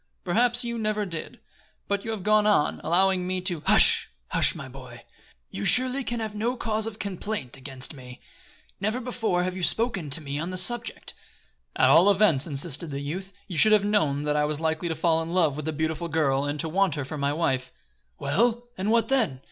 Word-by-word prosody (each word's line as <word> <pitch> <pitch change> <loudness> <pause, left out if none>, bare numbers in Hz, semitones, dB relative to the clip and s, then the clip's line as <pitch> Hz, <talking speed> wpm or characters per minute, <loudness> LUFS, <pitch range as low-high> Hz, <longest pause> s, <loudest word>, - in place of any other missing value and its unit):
"Perhaps 240 +7 +1
you 235 -1 -4
never 215 -1 -1
did; 165 -4 -7 0.5
but 200 0 -1
you 225 - -6
have 220 -4 -4
gone 210 +1 +3
on, 200 -8 +2
allowing 185 +1 +2
me 185 0 -1
to 180 -4 -1
" - - -25
"Hush! - - +5 0.2
Hush, - - +1
my - - -7
boy. 125 -3 -12 0.5
You 100 - -5
surely 255 - +5
can 240 -1 -3
have 220 -2 -4
no 230 +4 -2
cause 220 -1 -1
of 220 -2 -6
complaint 200 - -5
against 135 +1 -7
me. 125 -3 -12 0.6
Never 215 +5 -1
before 230 -7 -1
have 185 0 -3
you 190 - -5
spoken 195 -4 0
to 140 - -2
me 145 -1 -5
on 165 +3 -3
the 185 - -4
subject." 235 +5 -1 0.6
"At - - +4
all 180 +5 +6
events," 190 -9 +3
insisted 150 +2 -2
the 140 -1 -4
youth, 180 +7 -5 0.2
"you 175 -6 -3
should 215 0 +6
have 205 -1 +4
known 155 -9 +1
that 150 0 0
I 150 0 +2
was 150 0 -2
likely 160 +1 -1
to 160 - -2
fall 165 +1 +1
in 165 +2 -5
love 160 -6 +3
with 150 0 -6
the 160 - -1
beautiful 160 +2 -2
girl 145 -4 +1
and 145 +1 -3
to 165 - -4
want 185 0 +1
her 145 -3 -4
for 150 +2 -6
my 140 0 0
wife." 135 -5 -1 0.5
"Well, 235 +10 0
and 195 +3 -1
what 230 0 +3
then? 225 - +1
180 Hz, 215 wpm, -26 LUFS, 150-215 Hz, 0.6 s, all